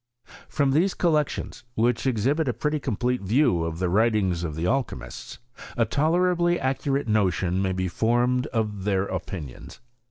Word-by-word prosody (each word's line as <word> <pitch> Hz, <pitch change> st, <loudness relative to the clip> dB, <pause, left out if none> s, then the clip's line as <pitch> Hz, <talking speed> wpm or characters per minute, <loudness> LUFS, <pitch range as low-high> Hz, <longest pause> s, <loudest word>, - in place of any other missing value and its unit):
From 140 Hz, -2 st, +1 dB
these 175 Hz, +7 st, +2 dB
collections, 155 Hz, -8 st, -1 dB
which 120 Hz, +3 st, +1 dB
exhibit 135 Hz, +6 st, +1 dB
a 125 Hz, -, +1 dB
pretty 150 Hz, +3 st, -1 dB
com 125 Hz, -7 st, -3 dB
plete 125 Hz, 0 st, 0 dB
view 100 Hz, -, +2 dB
of 80 Hz, 0 st, -3 dB
the 90 Hz, +1 st, 0 dB
writings 100 Hz, -3 st, +1 dB
of 80 Hz, -3 st, -4 dB
the 80 Hz, +2 st, -2 dB
alchymists, 90 Hz, -, -3 dB, 0.4 s
a 115 Hz, -, +3 dB
tolerably 175 Hz, +6 st, +2 dB
accurate 135 Hz, +1 st, -1 dB
notion 95 Hz, -3 st, +1 dB
may 95 Hz, -1 st, 0 dB
be 95 Hz, 0 st, -1 dB
formed 120 Hz, -, +1 dB
of 105 Hz, -6 st, -2 dB
their 95 Hz, -2 st, +1 dB
opinions. 90 Hz, -7 st, -7 dB
115 Hz, 155 wpm, -25 LUFS, 95-140 Hz, 0.4 s, a